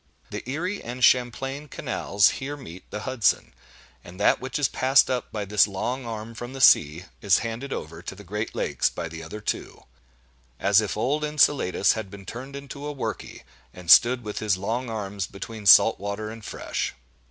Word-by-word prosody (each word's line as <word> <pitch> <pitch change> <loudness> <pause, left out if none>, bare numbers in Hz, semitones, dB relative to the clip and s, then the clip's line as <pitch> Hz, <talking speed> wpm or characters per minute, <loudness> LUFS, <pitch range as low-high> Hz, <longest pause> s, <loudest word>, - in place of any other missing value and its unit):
The - - -4
Erie 180 +8 -3
and 125 +2 -5
Champlain 135 +4 +2
canals 125 -9 +1
here 145 +2 -4
meet 95 -10 -11
the 105 - -5
Hudson; 130 -3 0 0.5
and 90 +2 -12
that 105 - +3
which 130 0 -3
is 145 -3 +2
passed 130 +1 +3
up 125 -2 -2
by 105 -2 -4
this 105 +1 +4
long 120 +6 -3
arm 110 0 -6
from 120 +3 -8
the 135 - -7
sea, 85 - +5 0.2
is 100 -2 +4
handed 115 +5 -5
over 80 +2 -6
to 95 - -7
the 105 - -12
great 105 +4 -4
lakes - - 0
by 85 - -5
the 80 0 -8
other 80 +7 -8
two,—as - - -3
if 105 -1 -3
old 140 +7 0
Enceladus 145 -10 +3
had 110 -3 -5
been 100 0 -11
turned 130 +6 -8
into 140 +1 -7
a - - -3
"worky," 135 - -5 0.3
and 90 -2 -1
stood 120 +1 +7
with 105 -1 -5
his 105 -3 +1
long 115 +6 -3
arms 100 -3 -4
between 105 +1 -7
salt 110 +3 +7
water 100 +2 -4
and 115 -1 -10
fresh. - - -4
110 Hz, 185 wpm, -25 LUFS, 100-130 Hz, 0.5 s, stood